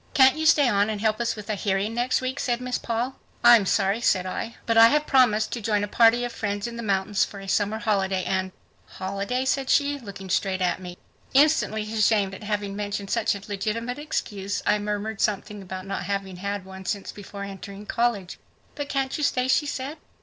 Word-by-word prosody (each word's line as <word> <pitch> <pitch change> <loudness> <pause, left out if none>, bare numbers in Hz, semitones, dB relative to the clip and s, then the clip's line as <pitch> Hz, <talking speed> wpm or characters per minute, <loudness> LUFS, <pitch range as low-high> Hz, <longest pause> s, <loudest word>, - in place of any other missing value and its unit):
"Can't 265 0 +7
you 315 0 0
stay 290 -3 +5
on 205 -2 +2
and 215 -1 -2
help 215 +1 +1
us 235 - 0
with 210 -2 -9
a 215 - -1
hearing 200 +1 -1
next 245 +3 +1
week?" 260 +2 -3
said 240 -1 0
Miss 250 0 -2
Paul. 235 +3 -2 0.3
"I'm 235 -4 +7
sorry," 200 +6 +1
said 185 -5 +2
I, 225 +5 -4
"but 230 - +1
I 225 0 +9
have 300 +4 +2
promised 230 -6 +3
to 240 - -3
join 210 -1 +1
a - - -1
party 230 +3 +4
of 245 - -3
friends 205 -2 -3
in 235 -1 -5
the 235 - -5
mountains 200 -1 +1
for 200 - -6
a 195 - -9
summer 205 +2 +1
holiday 195 -4 0
and.. 190 -1 -1 0.2
." - - -36
"Holiday?" 200 +7 -2
said 265 0 0
she, 285 0 +2
looking 200 -5 -9
straight 190 0 0
at 180 0 0
me. 180 -1 -8 0.4
Instantly 280 -7 +4
ashamed 210 -3 +2
at 195 - -9
having 205 -1 -3
mentioned 205 -1 -4
such 230 -3 +1
a 200 - -7
legitimate 230 +5 -3
excuse, 205 -10 -3
I 210 - +3
murmured 210 0 -3
something 210 0 -1
about 185 0 -7
not 195 -1 -4
having 195 -1 -3
had 200 +1 -4
one 190 0 -10
since 200 +1 -3
before 200 0 -9
entering 200 +1 -8
college. 215 -6 -1 0.3
"But 290 -1 -5
can't 270 -1 -1
you - - -1
stay?" 255 -3 +1
she 290 +3 +2
said. 280 +3 -4
210 Hz, 215 wpm, -25 LUFS, 195-240 Hz, 0.4 s, I